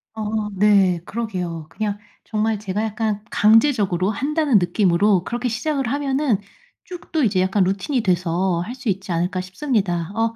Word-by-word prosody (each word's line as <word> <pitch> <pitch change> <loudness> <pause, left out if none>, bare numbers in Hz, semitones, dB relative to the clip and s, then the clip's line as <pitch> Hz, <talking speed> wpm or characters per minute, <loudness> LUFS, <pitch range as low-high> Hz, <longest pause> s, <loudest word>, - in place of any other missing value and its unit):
어 215 -1 -2
네 195 -3 +4
그러게요. 180 -8 -4
그냥 210 -2 -3 0.3
정말 215 0 -1
제가 205 +1 -2
약간 215 -1 -2
강제적으로 210 -4 +3
한다는 285 -1 +2
느낌으로 180 +1 +2
그렇게 240 +2 -2
시작을 270 +2 -1
하면은 275 -3 0 0.5
쭉 360 -2 -11
또 315 -4 +1
이제 200 -4 +2
약간 190 +1 +2
루틴이 195 +8 0
돼서 180 -1 +1
할 235 +7 -7
수 255 -3 -4
있지 195 -1 -2
않을까 180 +2 -1
싶습니다. 185 - -2
어 230 0 0
210 Hz, 335 characters per minute, -21 LUFS, 185-235 Hz, 0.5 s, 네